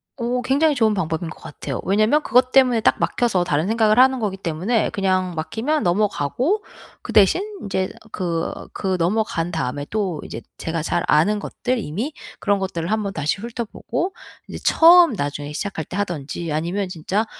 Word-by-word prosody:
오. 245 Hz, 0 st, -1 dB
굉장히 285 Hz, +5 st, +2 dB
좋은 220 Hz, -4 st, +3 dB
방법인 165 Hz, -3 st, -2 dB
것 -, -, -11 dB
같아요. 140 Hz, -3 st, -6 dB
왜냐하면 215 Hz, -, +3 dB
그것 255 Hz, +1 st, +3 dB
때문에 255 Hz, -4 st, +5 dB
딱 -, -, +3 dB
막혀서 215 Hz, -7 st, +1 dB
다른 160 Hz, +1 st, 0 dB
생각을 220 Hz, 0 st, +3 dB
하는 260 Hz, 0 st, +5 dB
거기 200 Hz, -4 st, -2 dB
때문에 190 Hz, +6 st, 0 dB
그냥 185 Hz, -2 st, 0 dB
막히면 230 Hz, -, -1 dB
넘어가고 210 Hz, -, 0 dB, 0.4 s
그 -, -, -7 dB
대신 210 Hz, -, +5 dB, 0.2 s
인제 190 Hz, -2 st, -2 dB, 0.2 s
그 170 Hz, -2 st, -2 dB, 0.3 s
그 190 Hz, -2 st, -1 dB
넘어간 175 Hz, -2 st, 0 dB
다음에 145 Hz, -3 st, -3 dB
또 195 Hz, -8 st, -2 dB
이제 115 Hz, -, -7 dB, 0.2 s
제가 165 Hz, -1 st, -3 dB
잘 175 Hz, +2 st, 0 dB
아는 200 Hz, +8 st, +3 dB
것들 255 Hz, +4 st, -2 dB
이미 215 Hz, -, -3 dB, 0.3 s
그런 205 Hz, -2 st, +1 dB
것들을 175 Hz, -3 st, -3 dB
1 220 Hz, -, +2 dB
번 200 Hz, -1 st, -3 dB
다시 155 Hz, +2 st, -1 dB
훑어보고 240 Hz, -, -4 dB, 0.3 s
이제 -, -, -7 dB
처음 340 Hz, -2 st, +7 dB
나중에 145 Hz, -4 st, -4 dB
시작할 160 Hz, -2 st, -4 dB
때 180 Hz, -, -8 dB
하든지 170 Hz, -4 st, -3 dB
아니면 175 Hz, +6 st, -1 dB
진짜 185 Hz, +5 st, -1 dB
195 Hz, 355 characters per minute, -21 LUFS, 165-235 Hz, 0.4 s, 처음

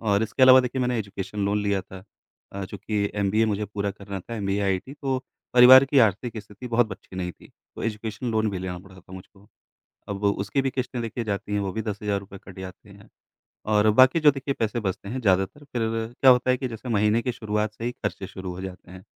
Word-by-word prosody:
और 105 Hz, -2 st, +1 dB
इसके 110 Hz, +4 st, -1 dB
अलावा 130 Hz, 0 st, +9 dB
देखिए 125 Hz, +1 st, -3 dB
मैंने 125 Hz, -1 st, 0 dB
एजुकेशन 100 Hz, 0 st, -4 dB
लोन 105 Hz, +1 st, 0 dB
लिया 100 Hz, -1 st, 0 dB
था 95 Hz, 0 st, -12 dB, 0.5 s
अ, 100 Hz, -1 st, -4 dB
चूँकि 100 Hz, +1 st, -3 dB
एमबीए 105 Hz, +2 st, +2 dB
मुझे 105 Hz, 0 st, -1 dB
पूरा 100 Hz, 0 st, -3 dB
करना 100 Hz, -1 st, -7 dB
था 115 Hz, -, -8 dB
एमबीए 100 Hz, 0 st, -1 dB
आईटी 95 Hz, +7 st, -1 dB
तो 135 Hz, -3 st, -2 dB, 0.4 s
परिवार 130 Hz, +2 st, +9 dB
की 140 Hz, 0 st, +2 dB
आर्थिक 110 Hz, +2 st, +1 dB
स्थिति 105 Hz, +4 st, -11 dB
बहुत 115 Hz, -2 st, +2 dB
अच्छी 95 Hz, -, -12 dB
नहीं 90 Hz, -1 st, -3 dB
थी, -, -, -18 dB, 0.3 s
तो -, -, -8 dB
एजुकेशन 110 Hz, +2 st, -4 dB
लोन 110 Hz, -1 st, +1 dB
भी 95 Hz, -, -4 dB
लेना 90 Hz, -1 st, -5 dB
पड़ा 95 Hz, 0 st, -15 dB
था 90 Hz, -, -17 dB
मुझको। 95 Hz, +2 st, -13 dB, 0.6 s
अब 100 Hz, -, -3 dB
वो 100 Hz, -1 st, +3 dB
उसकी 135 Hz, +7 st, 0 dB
भी 135 Hz, -, 0 dB
किश्तें 125 Hz, -1 st, -3 dB
देखिए 115 Hz, +1 st, -4 dB
जाती 105 Hz, 0 st, -3 dB
हैं 100 Hz, -, +1 dB
वो 95 Hz, -2 st, -3 dB
भी 110 Hz, +3 st, -3 dB
10 105 Hz, -3 st, -4 dB
हज़ार 100 Hz, -1 st, 0 dB
रुपए 100 Hz, 0 st, -12 dB
कट 95 Hz, 0 st, -12 dB
जाते 95 Hz, +2 st, -10 dB
हैं, 100 Hz, 0 st, -16 dB, 0.6 s
और 105 Hz, 0 st, +3 dB
बाकी 130 Hz, +7 st, +6 dB
जो 150 Hz, -1 st, +6 dB
देखिए 135 Hz, 0 st, -3 dB
पैसे 115 Hz, +1 st, 0 dB
बचते 100 Hz, -1 st, -4 dB
हैं 130 Hz, +2 st, -3 dB
ज़्यादातर 95 Hz, +7 st, +1 dB
फ़िर 120 Hz, -5 st, -2 dB, 0.3 s
क्या 130 Hz, -1 st, +9 dB
होता 125 Hz, +1 st, +3 dB
है 125 Hz, -, +1 dB
कि 130 Hz, -, -3 dB
जैसे 120 Hz, +1 st, -8 dB
महीने 105 Hz, +1 st, +2 dB
के 125 Hz, -, -1 dB
शुरुआत 105 Hz, -2 st, -2 dB
से 115 Hz, +2 st, -7 dB
ही 120 Hz, -, -1 dB
ख़र्चे 100 Hz, -4 st, -5 dB
शुरू 95 Hz, -1 st, -7 dB
हो 90 Hz, -, -8 dB
जाते 90 Hz, -1 st, -9 dB
हैं। 90 Hz, 0 st, -12 dB
105 Hz, 235 wpm, -25 LUFS, 100-120 Hz, 0.6 s, अलावा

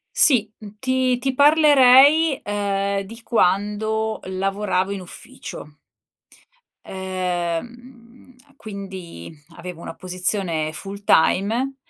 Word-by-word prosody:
Sì, 225 Hz, -8 st, +4 dB
mhmm, 210 Hz, -1 st, -12 dB
ti 260 Hz, 0 st, 0 dB
ti 265 Hz, +1 st, -2 dB
parlerei, 285 Hz, 0 st, +5 dB
ehm, 200 Hz, -1 st, -2 dB
di 225 Hz, +4 st, -12 dB
quando 215 Hz, +2 st, 0 dB
lavoravo 190 Hz, 0 st, -2 dB
in 200 Hz, -, -4 dB
ufficio. 175 Hz, -, -11 dB, 1.1 s
Ehm, 180 Hz, -2 st, -3 dB
mhmm, 245 Hz, 0 st, -18 dB, 0.2 s
quindi 190 Hz, -, -9 dB, 0.2 s
avevo 175 Hz, -1 st, -9 dB
una -, -, -7 dB
posizione 180 Hz, -4 st, -2 dB
full 200 Hz, +5 st, -7 dB
time 225 Hz, +10 st, +2 dB
205 Hz, 95 wpm, -21 LUFS, 185-250 Hz, 1.1 s, parlerei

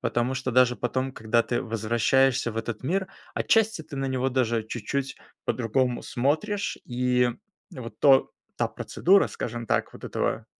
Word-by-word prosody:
потому 120 Hz, +2 st, 0 dB
что 130 Hz, 0 st, -2 dB
даже 125 Hz, 0 st, +5 dB
потом, 130 Hz, +2 st, -2 dB
когда 115 Hz, 0 st, +1 dB
ты 120 Hz, +1 st, -1 dB
возвращаешься 120 Hz, +3 st, +2 dB
в 110 Hz, -, -9 dB
этот 115 Hz, -1 st, -4 dB
мир, 190 Hz, +7 st, -1 dB, 0.3 s
отчасти 220 Hz, -5 st, +2 dB
ты 150 Hz, -2 st, -9 dB
на 135 Hz, 0 st, -1 dB
него 130 Hz, 0 st, 0 dB
даже 120 Hz, -3 st, +1 dB
чуть-чуть 135 Hz, +5 st, -4 dB, 0.3 s
по-другому 125 Hz, +1 st, 0 dB
смотришь. 160 Hz, -, -1 dB
И 125 Hz, 0 st, +1 dB, 0.4 s
вот 115 Hz, -3 st, -8 dB
то 135 Hz, -2 st, +5 dB, 0.3 s
та -, -, +1 dB
процедура, 195 Hz, +3 st, +2 dB
скажем 120 Hz, -1 st, -5 dB
так, -, -, 0 dB
вот -, -, -13 dB
этого -, -, -2 dB
125 Hz, 155 wpm, -26 LUFS, 120-135 Hz, 0.4 s, даже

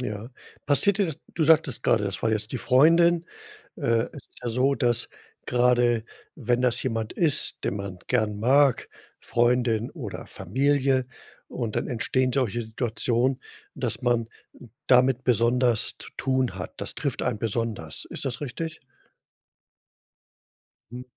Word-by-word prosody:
Ja, 105 Hz, 0 st, -5 dB, 0.4 s
passiert 195 Hz, +8 st, +3 dB
dir 200 Hz, -, +2 dB
das 160 Hz, -2 st, -6 dB, 0.2 s
du 160 Hz, -, +1 dB
sagtest 155 Hz, -5 st, +3 dB
grade, 105 Hz, -3 st, +2 dB
das 100 Hz, -1 st, -3 dB
war 110 Hz, -, +2 dB
jetzt 110 Hz, 0 st, -1 dB
die 130 Hz, -, -2 dB
Freundin. 165 Hz, +7 st, +4 dB, 0.5 s
Äh, 115 Hz, 0 st, +1 dB
es -, -, -11 dB
ist -, -, -11 dB
ja 120 Hz, -, -2 dB
so, 130 Hz, +4 st, +2 dB
dass 120 Hz, -4 st, +1 dB, 0.4 s
grade 120 Hz, -2 st, +2 dB, 0.3 s
wenn 125 Hz, -3 st, 0 dB
das 125 Hz, -2 st, +2 dB
jemand 115 Hz, -3 st, -2 dB
ist, 160 Hz, -5 st, +1 dB
den 100 Hz, -, -1 dB
man 100 Hz, -2 st, -6 dB
gern 110 Hz, -4 st, 0 dB
mag, 135 Hz, +3 st, +3 dB, 0.3 s
Freundin 120 Hz, -1 st, +1 dB
oder -, -, -7 dB
Familie 135 Hz, +3 st, 0 dB, 0.4 s
und 115 Hz, -4 st, -4 dB
dann -, -, -1 dB
entstehen 130 Hz, +1 st, 0 dB
solche 120 Hz, -4 st, 0 dB
Situationen, 120 Hz, +3 st, -1 dB, 0.3 s
dass -, -, -2 dB
man 120 Hz, -2 st, +1 dB, 0.6 s
damit 130 Hz, 0 st, +4 dB
besonders 120 Hz, -1 st, +2 dB
zu -, -, -5 dB
tun 130 Hz, -2 st, 0 dB
hat. -, -, -7 dB
Das -, -, -4 dB
trifft -, -, -3 dB
einen 105 Hz, -, -1 dB
besonders. 110 Hz, -7 st, -3 dB
Ist -, -, -5 dB
das 120 Hz, -4 st, -3 dB
richtig? 155 Hz, +4 st, -5 dB, 2.1 s
Hm. 125 Hz, +1 st, -7 dB
125 Hz, 140 wpm, -25 LUFS, 115-135 Hz, 2.1 s, Freundin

